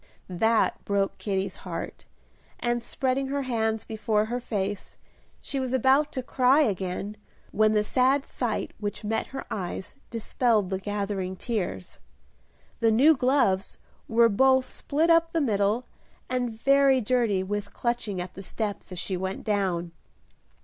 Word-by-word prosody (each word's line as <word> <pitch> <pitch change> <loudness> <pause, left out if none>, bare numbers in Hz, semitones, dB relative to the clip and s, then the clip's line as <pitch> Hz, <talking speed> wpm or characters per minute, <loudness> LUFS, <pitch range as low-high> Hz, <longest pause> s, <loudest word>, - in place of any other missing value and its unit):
That 220 +5 +1
broke 200 -1 -1
Kitty's 195 -2 -2
heart; - - -7 0.5
and, 240 0 0
spreading 265 +2 -1
her 280 +1 -1
hands 225 -3 -1
before 215 -1 0
her 240 +3 -3
face, 205 -4 -4 0.4
she 275 - -3
was 260 -1 -2
about 270 +4 +3
to 260 - -3
cry 260 +3 +4
again, 195 - -2 0.3
when 215 0 +3
the 210 -1 +3
sad 265 +5 +2
sight 240 -4 -3
which 210 +1 -4
met 220 +1 -1
her 270 - -7
eyes 190 +1 -4
dispelled 225 -3 +1
the 190 - -1
gathering 200 -2 -3
tears. 185 - -4 0.8
The 230 -1 +4
new 275 +9 +6
gloves 250 -8 +1 0.3
were 230 +1 +5
both 260 +4 +4
split 315 +5 0
up 330 0 +4
the 330 - +2
middle 215 -3 +1 0.4
and 245 -3 -2
very 275 0 +5
dirty 230 -5 +1
with 205 +1 -4
clutching 235 -5 -2
at 180 0 -5
the 195 - -8
steps 205 0 -4
as 180 - -6
she 185 +2 -2
went 190 +1 -4
down. 185 -5 -1
220 Hz, 145 wpm, -27 LUFS, 200-255 Hz, 0.8 s, new